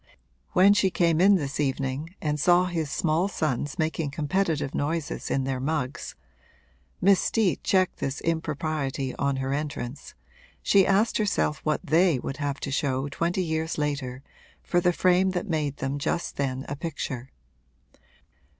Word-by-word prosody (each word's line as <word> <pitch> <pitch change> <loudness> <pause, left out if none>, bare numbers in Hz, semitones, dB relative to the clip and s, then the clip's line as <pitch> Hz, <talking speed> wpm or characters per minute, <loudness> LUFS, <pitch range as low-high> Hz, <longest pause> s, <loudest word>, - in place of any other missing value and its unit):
When 195 +3 +6
she 200 -2 +3
came 170 -2 +2
in 200 +2 +7
this 145 -6 -2
evening 140 +4 -2
and 150 -1 0
saw 175 +4 +4
his 165 -4 -2
small 165 +4 +1
sons 145 -7 -2
making 160 -1 -1
competitive 150 0 -1
noises 155 +1 -2
in 135 - +1
their 130 -1 -2
mugs 140 -1 -3 0.8
(Miss 195 +1 +5
Steet 215 -6 +1
checked 185 -1 +2
this 135 +1 -2
impropriety 155 -4 -2
on 140 -1 0
her 135 0 -2
entrance) 140 -3 -5 0.5
she 195 -2 +5
asked 205 +4 +2
herself 200 -8 +1
what 155 -1 -1
they 165 0 +4
would 135 +2 -5
have 145 -1 -2
to 140 - -3
show 135 0 0
twenty 175 +6 -1
years 160 -1 -2
later 140 -3 -2 0.4
for 175 - +1
the 180 0 +3
frame 185 +2 +3
that 180 - -3
made 150 -5 -1
them 135 +1 -2
just 170 +4 -2
then 135 -1 -2
a 145 - -3
picture. 140 -5 -5
155 Hz, 150 wpm, -26 LUFS, 140-175 Hz, 0.8 s, in